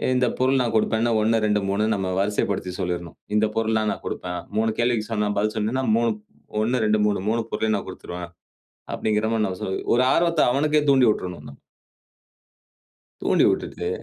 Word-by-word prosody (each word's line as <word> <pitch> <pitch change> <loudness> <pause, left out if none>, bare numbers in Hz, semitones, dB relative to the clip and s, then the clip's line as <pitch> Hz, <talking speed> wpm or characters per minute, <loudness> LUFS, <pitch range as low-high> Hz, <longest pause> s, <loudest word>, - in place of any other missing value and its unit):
இந்த 125 -1 +2
பொருள் 130 +1 +3
நான் 115 -2 -1
குடுப்பேன்னு 110 +2 +2
1 115 +1 +3
2 105 0 +2
3 100 +2 +1
நம்ம 95 -1 -2
வரிசைப்படுத்தி 100 -2 -1
சொல்லிரணும். 85 -2 -3 0.2
"இந்த 105 +1 +4
பொருள்லாம் 110 -1 +1
நான் - - -11
கொடுப்பேன்" 90 0 -4 0.2
3 110 0 +2
கேள்விக்கு 120 -3 +1
சொன்னா 105 -1 0
பதில் 105 +2 0
சொன்னேன்னா 115 +5 -1
3 115 -1 +2 0.5
1, 120 +3 +1
2, 105 0 +2
3. 105 -1 +1
3 115 +1 +1
பொருளையும் 110 -1 0
நான் - - -7
குடுத்துருவேன். 90 -1 -8 0.6
அப்டீங்கற 110 0 0
மாரி, 110 -1 +1
நான் 95 -1 -5
சொ - - -2 0.3
ஒரு 125 - +4
ஆர்வத்த 170 -2 +2
அவனுக்கே 150 +2 +2
தூண்டி 130 -3 +5
உட்றனுங்க. 90 -7 -7 1.7
தூண்டி - - +3
விட்டுட்டு. 85 - -2
110 Hz, 165 wpm, -23 LUFS, 100-120 Hz, 1.7 s, தூண்டி